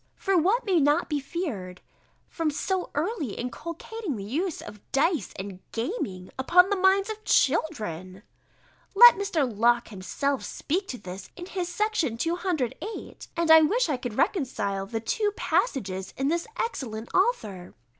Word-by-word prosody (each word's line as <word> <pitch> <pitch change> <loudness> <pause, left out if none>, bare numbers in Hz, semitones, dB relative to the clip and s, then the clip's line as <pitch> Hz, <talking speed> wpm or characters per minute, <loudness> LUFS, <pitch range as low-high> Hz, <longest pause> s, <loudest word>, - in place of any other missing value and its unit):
For 390 -1 0
what 395 +9 +3
may 375 -5 +3
not 295 +4 +2
be 295 -2 0
feared 260 - -5 0.5
from 325 -2 -1
so 365 +5 -2
early 305 - -1
inculcating 335 - -5
the 200 - -6
use 310 - -2
of 210 - -10
dice 305 - +1
and 190 -1 -7
gaming, 225 - -4
upon 360 +8 +5
the - - +3
minds 385 +2 +3
of 435 0 -8
children? 210 - 0 0.7
Let 480 +4 +11
Mr. 365 -8 0
Locke 235 +1 +2
himself 230 +8 -2
speak 370 +6 -2
to 250 - -5
this 185 -2 -9
in 355 - -7
his 365 -2 -3
Section 360 - 0
208, 335 - -3
and 335 -1 +3
I 320 0 +10
wish 420 +8 +2
I 280 - +1
could 245 -3 -5
reconcile 200 - 0
the 225 +2 -3
two 415 - 0
passages 190 - -1
in 270 +1 +1
this 340 +4 -1
excellent 235 - -4
author. 215 - 0
300 Hz, 150 wpm, -26 LUFS, 225-370 Hz, 0.7 s, Let